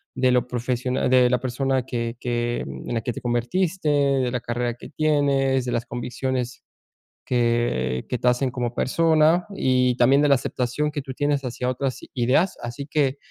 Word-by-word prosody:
de 130 -1 +2
lo 125 0 +2
profesiona 125 +1 -1
de 125 -1 +5
la 125 0 +2
persona 130 0 0
que 115 -2 -3
que 120 0 -1
en 65 - -6
la 115 - 0
que 120 - -2
te - - -6
convertiste, 155 +9 0
de 140 -3 +2
la 125 - -1
carrera 120 0 -2
que - - -11
tienes, 140 -4 +1
de 125 - -2
las 120 0 -1
convicciones 125 +1 -4 0.6
que 120 - 0
que 125 - -2
te 125 - +2
hacen 125 +2 +1
como 120 -1 -3
persona 160 - +3
y 125 -1 +2
también 135 +4 +5
de 145 - +3
la 140 - +6
aceptación 125 +4 -2
que 145 - -3
tú 130 -1 -7
tienes 145 +1 0
hacia 125 0 -3
otras 130 0 -3
ideas. 130 +9 +2
Así 120 +4 -6
que, 145 -3 +1
125 Hz, 180 wpm, -23 LUFS, 120-140 Hz, 0.6 s, la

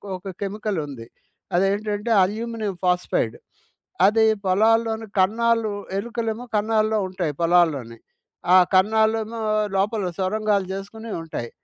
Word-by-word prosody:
ఒక 185 +1 -7
కెమికలుంది. 190 - -4 0.5
అదేంటంటే 205 +4 0
aluminium 215 0 -3
phosphide. 180 - 0 0.7
అది 220 +2 +4 0.2
పొలాల్లోని 225 +3 +2
కన్నాలు 225 +3 +2 0.3
ఎలుకలేమో 230 +2 -3
కన్నాల్లో 215 +1 +1
ఉంటాయి 180 -5 -3
పొలాల్లోని. 160 -9 +2 0.6
ఆ - - +9 0.2
కన్నాలేమో 220 +3 +2 0.4
లోపల 205 +1 0
సొరంగాలు 205 +1 0
జేసుకొని 220 +4 -8
ఉంటాయి. 155 -7 -6
210 Hz, 95 wpm, -23 LUFS, 185-225 Hz, 0.7 s, ఆ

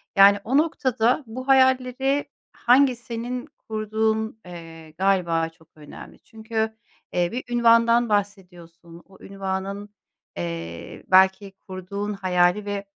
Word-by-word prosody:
yani, 200 +1 +7
o 265 +5 +1
noktada 260 -4 +1
bu 255 +4 -8
hayalleri 260 +1 +2 0.2
hangi 255 +1 +3
senin 240 +1 -6 0.2
kurduğun, 220 0 -1
eee, 165 -2 -11
galiba 170 -4 +1
çok 160 -1 -25
önemli. 150 -1 -13
Çünkü, 220 0 -4 0.4
eee, 175 -1 +1
bir 250 +2 -4
ünvandan 235 0 +4
bahsediyorsun. 175 -4 -5
O 190 - -19
ünvanın, 195 +1 -5 0.5
eee, 85 -1 -6
belki 190 +1 +4 0.2
kurduğun 200 +2 -5
hayali 185 +1 +1
ve 205 -1 -4
205 Hz, 110 wpm, -23 LUFS, 180-235 Hz, 0.5 s, yani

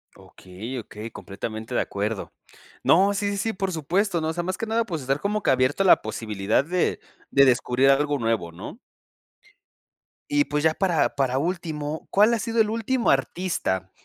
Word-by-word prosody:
Okey, 105 +8 -9
okey, 110 -1 -7
completamente 110 +3 -7
de - - +2
acuerdo. 100 +1 -3 0.5
No, 195 +4 +4
sí, 200 0 -1
sí, 200 - -3
sí, 220 +2 -1
por 190 -1 -2
supuesto, 175 +3 0
no, 155 - -1
o 160 - -1
sea, 175 +1 -3
más 185 +2 -3
que 225 - -3
nada, 225 +1 +1
pues, 165 -7 -4
estar 135 +2 -1
como 210 +5 -1
que - - 0
abierto 130 +6 +2
a 190 - +2
la - - +7
posibilidad 110 0 -1
de 175 +4 0 0.3
de 140 0 +6
descubrir 125 +1 +3
algo 145 +1 +2
nuevo, 115 -7 -1
¿no? 95 - -9 1.5
Y, 290 0 +3
pues, 150 - -2
ya 160 0 +4
para 180 -4 +1
para 135 -1 +1
último, 160 -2 -3
¿cuál 210 +4 +4
ha 230 - +1
sido 230 +1 +1
el 215 - +1
último 230 +3 0
artista 95 - -1
155 Hz, 185 wpm, -24 LUFS, 120-195 Hz, 1.5 s, la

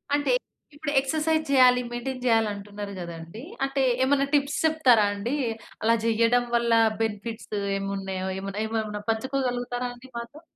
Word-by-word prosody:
అంటే 290 0 +1 0.4
ఇప్పుడు 290 0 -3
ఎక్సర్సైజ్ 315 +3 0
జేయాలి, 255 -2 +6
మెయింటైన్ 250 +1 -4
జేయాలంటున్నారు 205 -3 0
గదండీ! 170 +4 -8 0.2
అంటే 270 0 0 0.2
ఏమన్నా 275 +1 +3
టిప్స్ 285 0 +2
చెప్తా 315 -4 +4
రాండి? 205 +4 -1 0.5
అలా 230 +1 +4
చెయ్యడం 230 +2 +3
వల్ల 235 0 +2 0.3
బెనిఫిట్స్ 220 +1 -4 0.3
ఏమున్నాయో 195 -1 -3
ఏమున్నేమున్నా 210 +2 -3
పంచుకోగలుగుతారా 245 0 -2
అండి 250 +2 -15
మాతో? 235 +6 -8
235 Hz, 120 wpm, -26 LUFS, 205-270 Hz, 0.5 s, జేయాలి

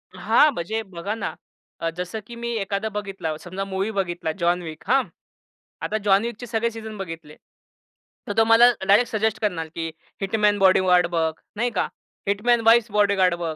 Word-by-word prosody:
हां, 300 - +4
म्हणजे 220 +5 -3
बघा 190 +2 -5
ना, 225 - -4 0.5
अ, 165 - -1
जसं 180 +4 -4
की 235 - -9
मी 235 0 -4
एखादा 200 +1 -2
बघितला 195 -6 -4
समजा, 185 +4 -6
मूव्ही 195 +2 -2
बघितला 175 -5 -2
जॉन 175 +1 +2
विक, 160 -1 -8
हां, 265 0 +4 0.8
आता 215 - -1
जॉन 195 0 +5
विकचे 235 +1 -6
सगळे 230 0 0
सीझन 220 -1 -8
बघितले. 165 -5 -8 0.9
तर 205 - -2
तो 225 - +6
मला 225 +1 +7 0.2
डायरेक्ट 230 +4 +4
सजेस्ट 220 -1 0
करणार 175 -6 -1
की 165 -1 -3 0.3
हिटमॅन, 205 0 +2
बॉडीगार्ड 185 -2 +5
बघ, 160 -1 +1 0.2
नाही 240 +3 0
का, - - +1 0.4
हिटमॅन्स 230 +4 +2
वाईफ्स 230 -1 +5
बॉडीगार्ड 200 -4 +3
बघ. 165 -2 -4
200 Hz, 170 wpm, -23 LUFS, 180-220 Hz, 0.9 s, मला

